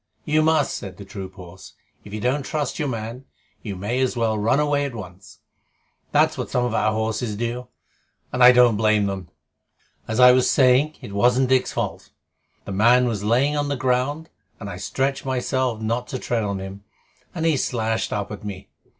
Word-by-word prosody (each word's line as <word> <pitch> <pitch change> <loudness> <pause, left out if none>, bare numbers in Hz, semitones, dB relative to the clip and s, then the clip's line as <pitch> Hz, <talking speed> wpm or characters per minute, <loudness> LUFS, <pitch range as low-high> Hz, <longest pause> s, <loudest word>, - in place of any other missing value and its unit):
"You 155 0 +2
must," 155 -2 +2
said 95 -2 -7
the 100 - -10
troop 95 -1 -8
horse. 90 -2 -12 0.3
"If 105 - -12
you 110 - -4
don't 125 +6 0
trust 145 0 -3
your 150 - 0
man, 115 +1 -5 0.4
you 100 -3 -5
may 105 +7 -2
as 130 -1 0
well 115 -2 +1
run 110 +6 +2
away 145 -1 +1
at 140 -4 -4
once. 95 -2 -11 0.7
That's - - +2
what - - -3
some 125 -1 0
of 120 - -2
our 110 -1 +2
horses 110 0 -2
do, 120 +3 -4 0.7
and 125 - +3
I 125 - +10
don't 120 -3 +5
blame 110 -1 +3
them. 95 -2 -4 0.8
As 110 +2 -2
I 125 0 +9
was 125 0 +3
saying, 135 +3 +4
it 100 - -9
wasn't 125 +5 +3
Dick's 130 -1 +2
fault. - - -4 0.6
The - - -6
man 120 +6 +4
was 105 -4 -2
lying 130 +7 +2
on 145 0 0
the 140 - 0
ground, 130 +6 -1 0.3
and - - -6
I - - -7
stretched 135 0 -2
myself 130 -2 -1
not 115 +3 -2
to 130 - -4
tread 120 -2 -1
on 100 -2 -2
him, 95 +1 -8 0.5
and 165 -2 -2
he 160 -2 +3
slashed 115 -4 -1
up 105 -1 -3
at 105 - -8
me. 100 -2 -7
120 Hz, 195 wpm, -23 LUFS, 105-130 Hz, 0.8 s, I